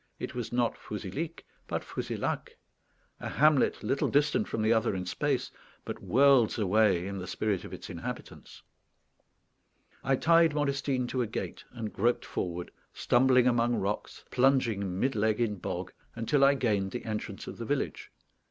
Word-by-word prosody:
It - - -5
was 120 -2 -4
not 120 -1 +1
Fouzilhic, 110 - -6 0.2
but - - -2
Fouzilhac, - - -4 0.6
a - - -5
hamlet 150 -2 +3
little 135 - +1
distant 150 +9 +2
from 110 - -2
the 110 +1 +4
other 110 -3 +1
in 90 -1 -3
space, 90 - -1 0.3
but - - -6
worlds 130 -3 +4
away 100 -3 +3
in 100 0 -4
the 90 - -6
spirit 100 -1 -1
of - - -9
its - - -8
inhabitants. - - -8 1.4
I 135 0 +2
tied 165 +1 +4
Modestine 140 -3 0
to 130 - -1
a 120 - 0
gate, 110 - -5
and 115 -3 -6
groped 120 +4 +1
forward, 90 0 -4 0.2
stumbling 125 0 +3
among 120 -1 +3
rocks, 100 0 -3
plunging 115 -8 +2
mid 135 +4 +1
leg 110 +1 +1
in 110 -4 0
bog, 90 +1 -5 0.2
until 125 +5 +2
I 140 +1 +6
gained 105 -7 0
the 125 - -5
entrance 110 -1 -4
of - - -8
the - - -4
village. - - -2
120 Hz, 160 wpm, -29 LUFS, 105-135 Hz, 1.4 s, I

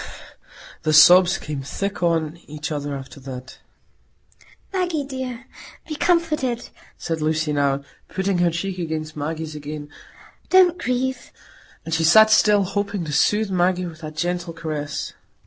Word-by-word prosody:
The 155 - 0
sobs 180 +4 +7
came 150 -2 -5
thick 195 +9 -4
on 165 -2 0
each 155 +2 -6
other 145 -1 -3
after 135 +1 -10
that. 130 -1 -9 1.1
"Maggie, 355 -5 0
dear, 260 -2 -6 0.4
be 315 - -4
comforted," 305 -8 0 0.3
said 165 -2 -3
Lucy 155 0 0
now, 140 -1 +1 0.2
putting 190 -1 -1
her 175 -1 +4
cheek 185 +3 -4
against 155 -2 -4
Maggie's 155 +1 -4
again. 150 0 -7 0.6
"Don't 360 -2 +5
grieve." 255 -1 -2 0.5
And 165 - -4
she 165 0 +1
sat 220 +7 +7
still, 210 -2 +5
hoping 200 -1 -2
to 150 - -5
soothe 210 +6 +2
Maggie 180 0 +1
with 165 -1 -9
that 155 -1 -7
gentle 175 +1 -2
caress. 155 -2 -4
170 Hz, 140 wpm, -22 LUFS, 155-210 Hz, 1.1 s, sobs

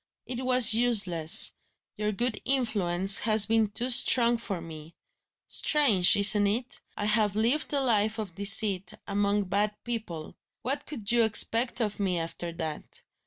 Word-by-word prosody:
It 250 0 -7
was 250 -3 +6
useless; 200 -9 +3 0.4
your 210 0 -4
good 230 +1 -5
influence 195 -8 +2
has 215 -2 +2
been 225 -1 -1
too 245 +5 -3
strong 240 -1 +4
for 200 -6 -6
me. 160 -1 -13 0.5
Strange, 230 - +2
isn't 205 0 +4
it? 240 +5 -5 0.2
I 205 - -4
have 210 -1 0
lived 235 +8 -2
a 285 - 0
life 220 -3 -1
of 210 -5 -7
deceit, 195 -1 +1
among 205 0 -2
bad 205 +3 -3
people. 215 -10 -7 0.3
What 275 +4 -5
could 230 -7 -5
you 240 0 +1
expect 230 +2 0
of 210 -2 -4
me, 190 -3 -2
after 170 +1 -6
that? 160 -2 -8
210 Hz, 150 wpm, -25 LUFS, 195-235 Hz, 0.5 s, was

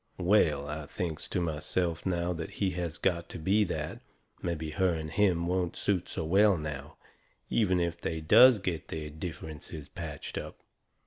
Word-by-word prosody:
Well, 85 -6 +3
I 75 0 -5
thinks 80 -1 -3
to - - -1
myself 85 +1 -1
now 90 -1 0
that 80 -1 -5
he 95 -2 0
has 85 -3 -3
got 85 -3 0
to - - -6
be 95 +6 +3
that, - - -4 0.4
mebby 80 -2 -3
her 95 +3 +2
and 80 -1 -4
him 90 -2 +2
won't 90 -1 0
suit 95 -4 0
so 80 - -3
well 100 +3 +5
now, 75 0 -6 0.5
even 95 -5 +3
if 85 0 -1
they 80 0 -2
does 120 +10 +8
get 90 -5 -3
their 75 -1 -5
differences 80 -2 -7
patched 80 -5 -6
up. - - -8
85 Hz, 170 wpm, -30 LUFS, 80-90 Hz, 0.5 s, does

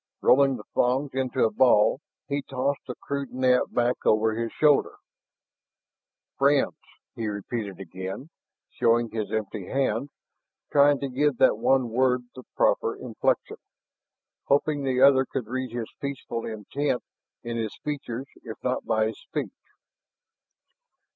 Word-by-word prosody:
Rolling 135 0 +5
the - - -10
thongs 130 +3 +1
into 130 -1 0
a 110 - +1
ball, 110 +1 +4 0.3
he 140 0 -1
tossed 135 +1 -2
the 125 - -5
crude 140 -2 -5
net 125 0 +2
back 120 +1 0
over 110 +1 +3
his 115 +1 -3
shoulder. 150 -2 +3 1.4
"Friends?" 140 0 +3 0.4
he 115 - -3
repeated 105 -1 -4
again, 95 - -7 0.4
showing 115 0 +2
his 110 -2 -3
empty 105 -3 -3
hands, 135 -1 0 0.6
trying 145 -1 +5
to 140 - -1
give 135 +1 +1
that - - +4
one 130 -3 +2
word 125 +1 +2
the 130 - -10
proper - - +2
inflection, - - -1 0.9
hoping 145 +1 +2
the 130 -2 0
other 135 -1 +7
could 130 -2 -4
read 130 +3 -3
his 120 -2 -5
peaceful 135 -4 -4
intent 120 +5 -2 0.4
in 120 0 -4
his 110 -2 -3
features 135 -4 -4 0.2
if 110 -2 -7
not 125 0 -1
by 110 0 +1
his 110 - -4
speech. - - -4
125 Hz, 135 wpm, -26 LUFS, 110-140 Hz, 1.4 s, other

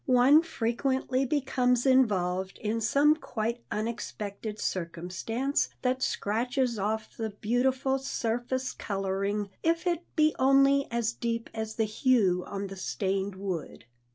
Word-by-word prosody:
One 260 +4 +6
frequently 260 -1 -1
becomes 250 -3 +1
involved 190 -8 +2
in 220 +2 -2
some 285 +7 +4
quite 235 -4 -3
unexpected 215 -1 -4
circumstance 185 - -2
that 255 0 +1
scratches 240 +2 0
off 215 +2 -2
the 225 -1 -3
beautiful 255 +6 0
surface 250 +1 -2
coloring, 195 +1 -2
if 335 +2 +1
it 345 -1 0
be 310 -1 +4
only 275 +1 +4
as 235 -1 0
deep 230 -1 -3
as 220 -1 -4
the 220 - +1
hue 210 -5 +2
on 200 0 -4
the 195 0 -7
stained 190 +7 -2
wood. 185 - -5
230 Hz, 125 wpm, -29 LUFS, 200-260 Hz, -, One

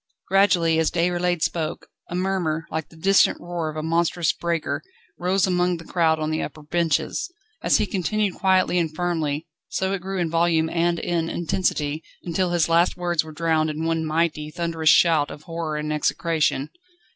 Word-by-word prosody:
Gradually, 175 -4 +4
as 160 - +2
Déroulède 175 0 0
spoke, 160 -2 -2 0.2
a 175 - -4
murmur, 180 -4 -1
like 160 -1 -3
the - - -17
distant 195 +4 +3
roar 175 -2 -4
of 155 - -7
a 155 - -3
monstrous 165 +1 +1
breaker, 170 -2 -2 0.4
rose 185 +2 +2
among 180 -1 +1
the 165 - -11
crowd 160 -2 +2
on 155 0 -1
the 155 - -1
upper 150 +1 -7
benches. 170 - -1 0.3
As - - +3
he - - +1
continued 205 +1 -1
quietly 185 -2 +2
and 160 -2 -2
firmly, 160 -3 -1 0.2
so 190 0 -1
it 195 - -3
grew 195 +1 -4
in 170 -3 -1
volume 165 -1 +2
and 170 0 +1
in 165 -1 -1
intensity, 160 -3 -1 0.2
until 180 +1 0
his 175 -2 +2
last 170 +1 +3
words 175 -2 0
were 160 - -10
drowned 160 0 +1
in 155 +1 -3
one 165 0 0
mighty, 155 -1 0
thunderous 165 -1 0
shout 165 -3 +5
of 150 - -10
horror 165 -2 -4
and 150 0 -2
execration. 155 -2 0
165 Hz, 180 wpm, -23 LUFS, 160-175 Hz, 0.4 s, shout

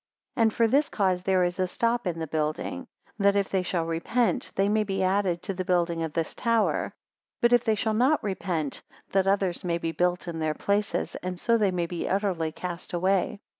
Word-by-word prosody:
134 - - -9
And 220 -1 +4
for 230 -1 +4
this 295 +2 +3
cause 185 -3 +1
there 185 0 +2
is 175 +1 -1
a 185 - +2
stop 235 +3 0
in 170 -2 -2
the 165 - -3
building, 160 - -3 0.3
that 200 0 +4
if 200 -1 +1
they 190 - +1
shall 175 -2 -1
repent, 230 - 0
they 195 +1 +2
may 215 +1 +2
be 195 -2 -1
added 185 -2 +1
to 195 - -3
the 185 0 -3
building 175 -2 +1
of 160 -2 -3
this 165 -2 -2
tower; 230 -2 0 0.4
but 240 0 +4
if 240 -1 +5
they 220 -3 +2
shall 220 0 0
not 260 +8 +3
repent, 180 -7 -2 0.3
that 195 0 +2
others 195 -3 +1
may 170 -2 0
be 165 -1 -2
built 180 +1 0
in 165 -1 -4
their 155 -1 0
places, 200 0 -1
and 180 0 -4
so 235 - +2
they 210 -3 +3
may 180 -2 -1
be 170 0 -4
utterly 185 -5 0
cast 175 +1 -6
away. 190 +3 +1
185 Hz, 215 wpm, -27 LUFS, 175-210 Hz, 0.4 s, if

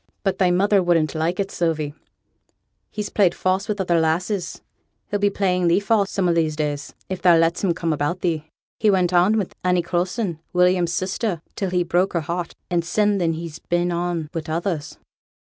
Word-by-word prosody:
'But 195 -1 0
thy 185 -2 +4
mother 195 +3 +3
wouldn't 170 -3 +2
like 165 +3 -1
it, 195 0 -1
Sylvie; 155 -4 -1 1.0
he's 210 -1 -5
played 190 -5 +3
false 190 +3 0
wi' 210 - +1
other 175 -3 +1
lasses, 175 +3 -1 0.4
he'll 205 - -2
be 205 0 +3
playing 180 -3 +1
thee 170 +3 +4
false 205 -1 +1
some 190 -2 0
o' 170 - +3
these 160 -2 +1
days, 150 -2 -3
if 185 -1 -5
thou 175 -3 +6
lets 165 +3 +1
him 175 -4 +2
come 165 -2 -1
about 150 +5 -2
thee. 160 -3 -1 0.3
He 215 - +3
went 185 -2 +2
on 180 +5 +4
wi' 205 - +1 0.2
Annie 180 -1 +2
Coulson, 175 +1 -2
William's 180 -1 +3
sister, 185 -1 -2
till 195 - -2
he 180 0 +1
broke 175 +3 +1
her 170 - +1
heart; 170 +2 -4
and 175 -2 0
sin 205 +3 +1
then 165 -2 +1
he's 160 -1 -6
been 175 0 0
on 170 -2 -2
wi' 165 - -2
others.' 165 -1 -3
175 Hz, 195 wpm, -22 LUFS, 165-190 Hz, 1.0 s, thou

